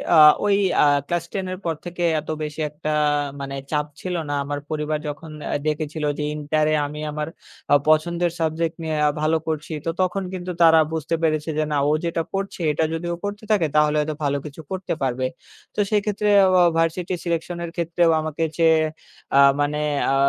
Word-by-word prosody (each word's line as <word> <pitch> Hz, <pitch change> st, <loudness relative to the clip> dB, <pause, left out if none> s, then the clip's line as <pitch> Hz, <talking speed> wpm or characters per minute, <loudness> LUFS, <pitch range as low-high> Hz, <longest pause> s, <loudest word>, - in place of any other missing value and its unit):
আ -, -, +7 dB, 0.3 s
ওই 200 Hz, -1 st, +4 dB, 0.3 s
আ -, -, +6 dB, 0.2 s
ক্লাস 175 Hz, -1 st, -1 dB
10 190 Hz, -2 st, -2 dB
এর -, -, -5 dB
পর 165 Hz, -, 0 dB
থেকে 175 Hz, 0 st, -4 dB, 0.2 s
এত 155 Hz, -, -10 dB
বেশি 150 Hz, +1 st, -6 dB
একটা 150 Hz, +1 st, -6 dB, 0.5 s
মানে 140 Hz, 0 st, -5 dB, 0.2 s
চাপ 150 Hz, -1 st, +1 dB, 0.2 s
ছিল 180 Hz, -1 st, -3 dB
না। -, -, -1 dB
আমার 145 Hz, 0 st, -3 dB
পরিবার 150 Hz, 0 st, -1 dB
যখন 150 Hz, +2 st, -6 dB, 0.2 s
আ -, -, +1 dB
দেখেছিল 155 Hz, 0 st, -2 dB
যে 150 Hz, -, -2 dB
ইন্টারে 150 Hz, +1 st, +1 dB
আমি 150 Hz, +1 st, -6 dB
আমার 150 Hz, +1 st, -3 dB, 0.4 s
আ -, -, +8 dB
পছন্দের 170 Hz, +2 st, +2 dB
সাবজেক্ট 160 Hz, +1 st, -1 dB
নিয়ে 160 Hz, -1 st, -2 dB
আ -, -, +4 dB
ভালো 160 Hz, +1 st, +2 dB
করছি। 155 Hz, 0 st, -3 dB
তো -, -, 0 dB
তখন 185 Hz, +1 st, 0 dB
কিন্তু 180 Hz, 0 st, -4 dB
তারা 160 Hz, -1 st, +7 dB
বুঝতে 160 Hz, +1 st, -1 dB
পেরেছে 155 Hz, 0 st, +1 dB
যে 155 Hz, -, +2 dB
না 145 Hz, -, +1 dB
ও -, -, +3 dB
যেটা 165 Hz, 0 st, 0 dB
পড়ছে 195 Hz, -1 st, -3 dB
এটা 160 Hz, -, 0 dB
যদি 165 Hz, +1 st, -3 dB
ও -, -, -2 dB
পড়তে 205 Hz, +1 st, -4 dB
থাকে 180 Hz, -7 st, +3 dB
তাহলে 150 Hz, 0 st, +4 dB
হয়তো 150 Hz, 0 st, -1 dB
ভালো 140 Hz, 0 st, +1 dB
কিছু 150 Hz, +2 st, -8 dB
করতে 190 Hz, -2 st, -2 dB
পারবে। 130 Hz, -1 st, 0 dB, 0.5 s
তো -, -, -4 dB
সেক্ষেত্রে 210 Hz, 0 st, 0 dB, 0.2 s
অ -, -, +4 dB
অ -, -, +7 dB
ভার্সিটি 165 Hz, +2 st, 0 dB
সিলেকশন 170 Hz, 0 st, -2 dB
এর 170 Hz, -, -5 dB
ক্ষেত্রেও 170 Hz, 0 st, +2 dB
আমাকে 155 Hz, +1 st, -3 dB, 0.2 s
চেয়ে 160 Hz, -1 st, +5 dB, 0.6 s
আ -, -, +7 dB, 0.2 s
মানে 145 Hz, +1 st, 0 dB, 0.4 s
আ -, -, +3 dB
160 Hz, 195 wpm, -23 LUFS, 150-175 Hz, 0.6 s, আ